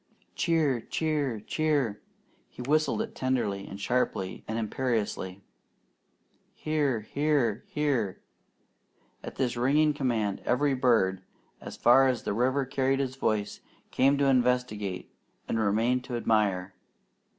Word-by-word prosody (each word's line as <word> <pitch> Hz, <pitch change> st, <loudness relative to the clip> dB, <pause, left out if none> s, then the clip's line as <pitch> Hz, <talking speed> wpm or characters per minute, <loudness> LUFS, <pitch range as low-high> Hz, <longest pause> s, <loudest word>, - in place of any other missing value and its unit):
"Cheer! 155 Hz, -8 st, +1 dB
Cheer! 145 Hz, -8 st, -1 dB
Cheer!" 140 Hz, -6 st, 0 dB, 0.5 s
He 125 Hz, -, -9 dB
whistled 155 Hz, -, +1 dB
it 225 Hz, -, -9 dB
tenderly 120 Hz, -7 st, -1 dB
and 100 Hz, -, -8 dB
sharply 100 Hz, -5 st, -1 dB
and 110 Hz, -, -3 dB
imperiously. 110 Hz, -5 st, -2 dB, 1.1 s
"Here! 145 Hz, -7 st, 0 dB
Here! 135 Hz, -2 st, 0 dB
Here!" 135 Hz, -10 st, -1 dB, 1.0 s
At -, -, -8 dB
this 125 Hz, -2 st, -1 dB
ringing 145 Hz, +5 st, +3 dB
command, 115 Hz, -8 st, -1 dB
every 140 Hz, +3 st, +1 dB
bird, 110 Hz, -8 st, +2 dB, 0.4 s
as -, -, -8 dB
far 135 Hz, +3 st, +6 dB
as 125 Hz, -3 st, -1 dB
the -, -, -2 dB
river 130 Hz, +5 st, +1 dB
carried 135 Hz, 0 st, 0 dB
his 130 Hz, -1 st, -2 dB
voice, 110 Hz, -6 st, -1 dB, 0.3 s
came 135 Hz, +2 st, +3 dB
to 140 Hz, -, +2 dB
investigate 125 Hz, -7 st, 0 dB, 0.3 s
and 115 Hz, -, -1 dB
remained 115 Hz, +4 st, +1 dB
to 125 Hz, -2 st, -3 dB
admire. 100 Hz, -5 st, +1 dB
125 Hz, 120 wpm, -28 LUFS, 110-140 Hz, 1.1 s, far